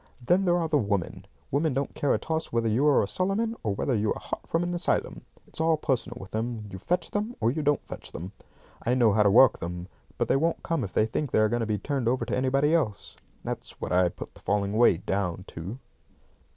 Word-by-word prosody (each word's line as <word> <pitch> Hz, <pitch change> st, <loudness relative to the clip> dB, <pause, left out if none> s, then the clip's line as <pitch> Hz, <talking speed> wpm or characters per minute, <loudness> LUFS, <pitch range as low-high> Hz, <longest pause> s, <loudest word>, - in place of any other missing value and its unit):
Then 175 Hz, +10 st, +2 dB
there 175 Hz, -1 st, +3 dB
are 165 Hz, -2 st, 0 dB
the 150 Hz, -2 st, +2 dB
women. 100 Hz, -6 st, -2 dB, 0.2 s
Women 145 Hz, 0 st, +1 dB
don't 140 Hz, +1 st, -1 dB
care 145 Hz, -, 0 dB
a -, -, +3 dB
toss 160 Hz, 0 st, -3 dB
whether 115 Hz, -1 st, +1 dB
you 120 Hz, +7 st, +2 dB
are 145 Hz, -, +5 dB
a -, -, -2 dB
Solomon, 195 Hz, -, 0 dB
or 105 Hz, -3 st, -1 dB
whether 130 Hz, -, 0 dB
you 105 Hz, 0 st, +1 dB
are -, -, -7 dB
hot -, -, -6 dB
from 165 Hz, +1 st, 0 dB
an 175 Hz, 0 st, -2 dB
asylum. 175 Hz, -, 0 dB, 0.2 s
It's -, -, -6 dB
all 160 Hz, -1 st, +3 dB
personal 130 Hz, -4 st, -1 dB
with 95 Hz, -, -10 dB
them. 110 Hz, 0 st, -3 dB
You 95 Hz, -, -7 dB
fetch 170 Hz, -, -1 dB
them, 215 Hz, +4 st, -2 dB
or 115 Hz, -, +2 dB
you 155 Hz, +4 st, -2 dB
don't 145 Hz, -1 st, +1 dB
fetch -, -, -8 dB
them. 90 Hz, +4 st, -7 dB, 0.5 s
I 125 Hz, -, +1 dB
know 120 Hz, -4 st, +4 dB
how 105 Hz, -, +3 dB
to 105 Hz, -, +5 dB
work 120 Hz, +4 st, +6 dB
them, 85 Hz, +1 st, -5 dB, 0.3 s
but -, -, 0 dB
they -, -, +3 dB
won't 165 Hz, +4 st, 0 dB
come 165 Hz, -6 st, -1 dB
if 95 Hz, -, -5 dB
they 110 Hz, -, +3 dB
think 135 Hz, +6 st, -2 dB
they -, -, +1 dB
are 110 Hz, 0 st, +4 dB
going 120 Hz, +2 st, 0 dB
to 115 Hz, -, -1 dB
be 105 Hz, -1 st, 0 dB
turned 135 Hz, +3 st, -2 dB
over 120 Hz, -1 st, +1 dB
to 115 Hz, -, -1 dB
anybody 135 Hz, +4 st, +2 dB
else. 110 Hz, -11 st, -1 dB, 0.3 s
That's -, -, -5 dB
what -, -, -4 dB
I 90 Hz, 0 st, +4 dB
put -, -, -9 dB
the -, -, -16 dB
falling 100 Hz, 0 st, 0 dB
away 110 Hz, -5 st, +5 dB
down 95 Hz, -1 st, -2 dB
to." 90 Hz, +9 st, -6 dB
120 Hz, 245 wpm, -27 LUFS, 105-155 Hz, 0.5 s, work